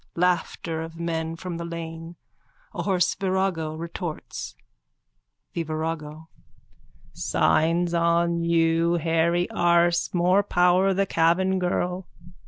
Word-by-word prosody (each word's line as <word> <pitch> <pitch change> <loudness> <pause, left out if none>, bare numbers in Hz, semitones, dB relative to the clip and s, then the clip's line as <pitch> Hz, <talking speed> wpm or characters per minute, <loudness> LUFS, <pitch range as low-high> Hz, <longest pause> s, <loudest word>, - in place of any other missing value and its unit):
Laughter 170 -2 0
of 165 0 -8
men 165 -1 -2
from 175 0 -6
the 170 - -5
lane. 165 0 -7 0.6
A - - -3
hoarse 180 -3 +1
virago 185 -5 -1
retorts.)_ 165 - -6 1.0
THE 170 - -2
VIRAGO: 155 0 -4 0.9
Signs 170 +2 +1
on 170 0 +2
you, 165 0 +2
hairy 170 +1 +1
arse. 170 0 +2
More 180 +2 +3
power 180 0 +3
the 195 +1 +2
Cavan 185 +2 +2
girl. 180 0 -1
170 Hz, 105 wpm, -25 LUFS, 165-180 Hz, 1.0 s, More